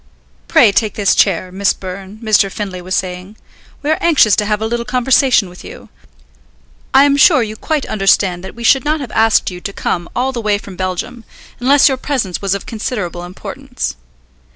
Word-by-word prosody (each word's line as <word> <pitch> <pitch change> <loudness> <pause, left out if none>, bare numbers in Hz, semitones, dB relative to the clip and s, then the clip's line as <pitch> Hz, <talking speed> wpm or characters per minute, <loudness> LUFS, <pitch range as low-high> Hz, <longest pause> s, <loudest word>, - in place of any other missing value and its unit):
"Pray - - +5
take 215 +1 0
this 205 -2 +2
chair, 185 -2 +1
Miss 195 +1 +1
Byrne," 190 +2 -9
Mr. 210 -3 +2
Findlay 190 -3 -5
was 185 +1 -3
saying. 185 +3 -4 0.5
"We 295 - 0
are 315 - +1
anxious 285 - +4
to 210 - +1
have 210 -1 0
a 220 - -2
little 235 +1 -2
conversation 250 -1 +2
with 180 0 -13
you. - - -12 1.0
I 270 - +6
am 285 0 +3
sure 260 -2 +5
you 215 -1 -6
quite 300 +5 -2
understand 195 -3 +1
that 190 - -9
we 235 - -9
should 270 +3 +4
not 305 +1 0
have 265 -6 -7
asked 225 -3 +2
you 180 0 -9
to 200 - -5
come 175 -3 -3
all 260 +2 0
the 240 -3 -4
way 210 -2 +1
from 200 -2 -11
Belgium 185 +6 -4 0.4
unless 275 +3 +5
your 265 -2 +1
presence 255 -10 -3
was 195 -1 0
of 200 - -6
considerable 205 -6 -4
importance. 245 +8 -6
215 Hz, 195 wpm, -16 LUFS, 190-250 Hz, 1.0 s, I